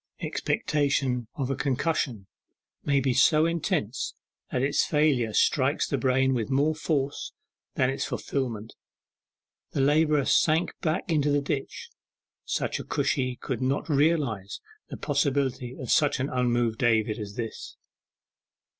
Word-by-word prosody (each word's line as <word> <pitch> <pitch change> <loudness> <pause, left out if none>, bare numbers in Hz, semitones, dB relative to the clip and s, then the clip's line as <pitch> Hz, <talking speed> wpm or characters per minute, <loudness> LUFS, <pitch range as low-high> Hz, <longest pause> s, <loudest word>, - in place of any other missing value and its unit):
Expectation 135 -5 0
of 135 -2 -2
a - - 0
concussion 130 -6 -1 0.6
may 140 -1 +2
be 135 -1 +1
so 155 +5 +4
intense 165 - -1 0.4
that 125 - 0
its 140 +1 +2
failure 145 -7 +2
strikes 140 +5 +2
the - - -1
brain 130 +1 +2
with 115 -4 -2
more 145 +4 +2
force 145 -3 -2 0.4
than 130 0 +2
its 135 - -3
fulfilment. 115 -5 -3 1.0
The - - 0
labourer 150 0 +3
sank 160 +2 +3
back 160 0 0
into 150 -2 +2
the 145 0 +3
ditch. 140 -1 -4 0.5
Such - - -2
a - - -5
Cushi 130 -1 -1
could 130 -3 -3
not 135 +5 -1
realize 140 - +1 0.3
the - - -6
possibility 135 -3 -1
of 130 - -4
such 145 -2 +3
an 135 +2 -1
unmoved 120 -3 0
David 110 -2 +2
as 100 -1 -7
this. 115 -2 -6
135 Hz, 135 wpm, -27 LUFS, 125-145 Hz, 1.0 s, so